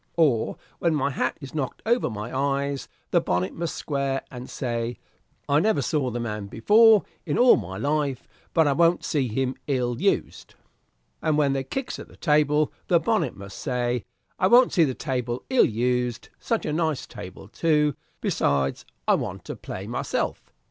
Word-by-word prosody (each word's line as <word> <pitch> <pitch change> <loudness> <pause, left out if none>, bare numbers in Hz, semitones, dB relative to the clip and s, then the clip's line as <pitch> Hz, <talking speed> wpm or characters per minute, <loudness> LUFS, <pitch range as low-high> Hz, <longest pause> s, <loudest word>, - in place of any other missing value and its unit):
Or 140 -9 +2 0.2
when 170 -2 +2
my 140 -1 0
hat 130 -1 -1
is 140 - -9
knocked 145 -4 -3
over 235 - +2
my 110 +2 -6
eyes, 140 0 -1 0.2
the - - +4
bonnet 90 +2 -1
must 170 -1 -3
square, 140 -2 -2
and 125 0 -8
say, 120 -2 -3 0.5
'I 145 +1 +4
never 170 -6 +2
saw 135 0 0
the 120 0 -3
man 105 -3 -4
before 215 - +5 0.2
in 150 - -1
all 245 0 +7
my 95 +2 -5
life, 145 +1 -1 0.2
but 160 -3 +4
I 140 - +3
won't 170 +4 +3
see 140 -5 0
him 130 +3 -1
ill 125 -4 -1
used.' - - -1 0.7
And 155 -2 +1
when 140 -2 +3
they 135 -1 -1
kicks 265 - -4
at - - -9
the - - -17
table, 150 -1 +2
the 170 - +4
bonnet 205 - 0
must 100 0 -9
say, 125 -3 -1 0.4
'I 185 - +4
won't 245 +4 +6
see 170 -4 +5
the 130 -3 -2
table 125 -2 -3
ill 260 - +6
used, 125 +1 -1
such 230 - -1
a - - -1
nice 160 -3 0
table, 95 -3 -10
too; 150 +5 +2 0.3
besides, 70 -1 0 0.2
I - - +5
want - - -3
to - - -5
play - - -7
myself.' - - -3
140 Hz, 175 wpm, -25 LUFS, 120-155 Hz, 0.7 s, all